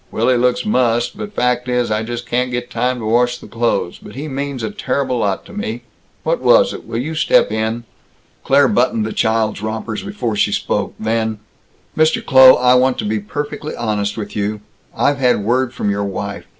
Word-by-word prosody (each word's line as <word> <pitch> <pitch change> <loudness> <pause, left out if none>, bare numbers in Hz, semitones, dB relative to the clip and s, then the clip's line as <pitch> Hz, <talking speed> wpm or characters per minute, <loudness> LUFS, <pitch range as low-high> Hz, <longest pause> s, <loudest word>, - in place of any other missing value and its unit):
Willy 120 +3 +2
looks 125 - +1
mussed, 120 - +1
but 215 -2 -6
fact 125 -2 0
is, 125 -2 0
I 105 0 +1
just 120 +1 -5
can't 125 +1 0
get 120 -1 -4
time 125 0 0
to 115 - -6
wash 120 +2 +2
the - - -13
clothes, 115 -6 -1
but 105 - -12
he 145 +4 -5
means 140 -3 -4
a 110 - -2
terrible 130 -1 -1
lot 100 -3 -1
to - - -13
me. 120 - -4 0.4
What - - 0
was - - +4
it? - - -9
Will 115 - -4
you 145 +7 -3
step 155 - +3
in?" 110 +2 -2 0.6
Claire 140 0 +4
buttoned 120 -3 +1
the 110 - -4
child's 110 -2 0
rompers 110 0 -4
before 125 - -3
she 105 0 +1
spoke. - - -2
Then: 110 0 -1 0.6
"Mr. 155 0 +2
Kloh, 130 -1 +8
I 125 0 +4
want 125 0 +3
to - - -3
be 105 +1 -1
perfectly 145 +7 -5
honest 105 -3 -2
with 105 -2 -6
you. 105 0 -2 0.4
I've 140 0 +2
had 125 -5 +2
word 125 +2 +1
from 105 -4 -2
your 100 0 -1
wife. 100 0 -5
120 Hz, 200 wpm, -18 LUFS, 110-130 Hz, 0.6 s, Kloh